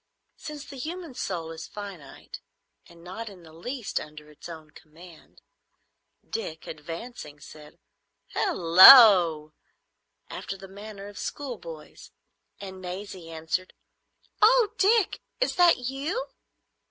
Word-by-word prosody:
Since 300 -2 -9
the 275 - -11
human 335 +1 -6
soul 170 -8 -4
is 160 0 -8
finite 195 -9 -10 0.5
and 170 -1 -17
not 210 +6 -7
in 185 -4 -15
the 160 -1 -16
least 235 +8 -4
under 150 0 -12
its 150 - -12
own 160 -2 -11
command, 160 +3 -17 0.8
Dick, 160 -8 -6
advancing, 165 +1 -9
said 150 +1 -14 0.5
"Halloo!" 175 - +7 0.8
after 195 - -7
the 195 0 -12
manner 200 +1 -10
of 205 - -11
schoolboys, 185 - -8 0.5
and 190 -1 -9
Maisie 185 -1 -8
answered, 165 +3 -4 0.7
"Oh, 465 0 +5
Dick, 415 +1 +2 0.2
is - - 0
that 350 -1 +5
you?" 275 - -4
190 Hz, 115 wpm, -26 LUFS, 160-250 Hz, 0.8 s, Halloo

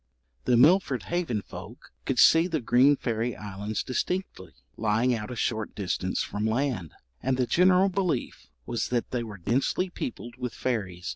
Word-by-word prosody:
The 120 - +4
Milford 145 -1 +4
Haven 165 - -2
folk - - -11
could - - -1
see 165 +2 +6
the 165 -4 -1
green 130 +4 +4
fairy 115 -1 -2
islands 105 +1 -4
distinctly, 130 - -3 0.2
lying 115 +3 +1
out 105 -2 -4
a 125 - -5
short 110 -2 -2
distance 100 -3 -1
from 105 - -4
land; 110 - -1 0.3
and 130 0 0
the 130 - +2
general 180 +6 +4
belief 180 -9 -2 0.2
was 120 - -2
that 120 -1 -1
they 125 - -1
were 110 -3 -7
densely 135 - 0
peopled 120 -6 -6
with 125 -2 -4
fairies. 95 -8 -3
120 Hz, 160 wpm, -27 LUFS, 110-145 Hz, 0.3 s, see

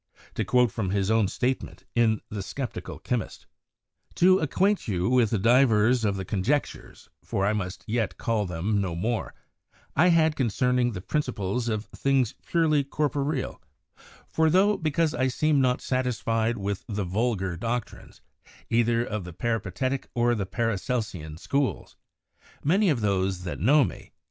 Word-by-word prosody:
To - - -1
quote 125 -3 +3
from 100 -3 -2
his 100 +1 0
own 110 -3 +3
statement 130 +6 -2
in 110 -3 +2
'The 105 -1 -4
Sceptical 130 +5 -6
Chymist': 125 -3 -3 0.7
"To 185 +1 +5
acquaint 190 +4 +1
you 90 -4 0
with 120 -4 +3
divers 120 -1 +4
of 100 -2 +1
the 95 -1 -4
conjectures 110 +11 -2
(for 95 - -1
I 105 - +2
must 95 -3 -4
yet 115 0 -1
call 110 -4 -1
them 95 +5 -1
no 90 -4 -2
more) 110 +6 -2 0.6
I 160 - +5
have 175 - +5
had 160 -1 +3
concerning 125 0 +1
the 95 - -5
principles 120 -3 -2
of 110 0 -2
things 135 -4 0
purely 155 -4 +2
corporeal: 145 0 -2 0.7
for 160 0 +2
though, 195 +5 +4
because 160 -1 0
I 130 - +1
seem 145 +2 +2
not 125 -1 +1
satisfied 115 -2 0
with 100 -1 -3
the 105 -2 -2
vulgar 95 -1 -1
doctrines, 115 +6 -5 0.5
either 115 0 +2
of 105 -5 -4
the 90 -1 -9
Peripatetick 115 +5 -2
or 120 0 +2
Paracelsian 105 -5 -2
schools, 140 - -2 0.7
many 190 +7 +3
of 135 -7 +1
those, 95 -3 0
that 90 - -5
know 140 - +5
me 95 - -6
120 Hz, 150 wpm, -26 LUFS, 100-135 Hz, 0.7 s, To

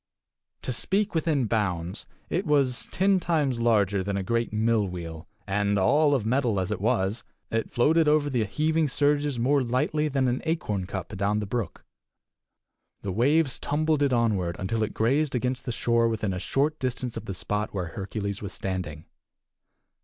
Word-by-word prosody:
To - - -2
speak 200 - 0
within 155 -5 +1
bounds, 95 -4 -2 0.2
it 180 +2 -2
was 140 -4 +1
ten 195 0 +3
times 150 -8 0
larger 105 -4 +2
than 100 +1 -2
a 95 - -2
great 115 +4 0
mill 110 -1 +2
wheel, 85 -2 -7 0.2
and, 100 +1 +1
all 145 +9 +4
of 120 -6 -1
metal 120 -3 +1
as 95 - -2
it - - -2
was, 110 -1 0 0.3
it 115 0 -1
floated 155 +6 +3
over 150 -1 +3
the 125 -5 +1
heaving 155 +8 +1
surges 145 0 +1
more 135 +4 +2
lightly 130 +5 0
than 135 -3 +1
an 125 +1 0
acorn 105 - -2
cup 95 +1 -5
adown 100 +2 0
the 105 - -3
brook. 105 -3 -4 1.2
The 100 - -2
waves 135 - +2
tumbled 155 +1 0
it 140 -2 +3
onward 105 -8 +1
until 110 +4 -2
it 110 - -2
grazed 135 +5 +1
against 125 +1 -2
the 125 - -2
shore 115 0 +2
within 110 -3 -1
a 90 - -3
short 145 - 0
distance 125 -1 -3
of 115 -1 -6
the 95 - -4
spot 105 +3 -2
where 90 -4 -3
Hercules 100 +2 -4
was 100 -2 -6
standing. 90 -5 -4
115 Hz, 175 wpm, -26 LUFS, 100-145 Hz, 1.2 s, all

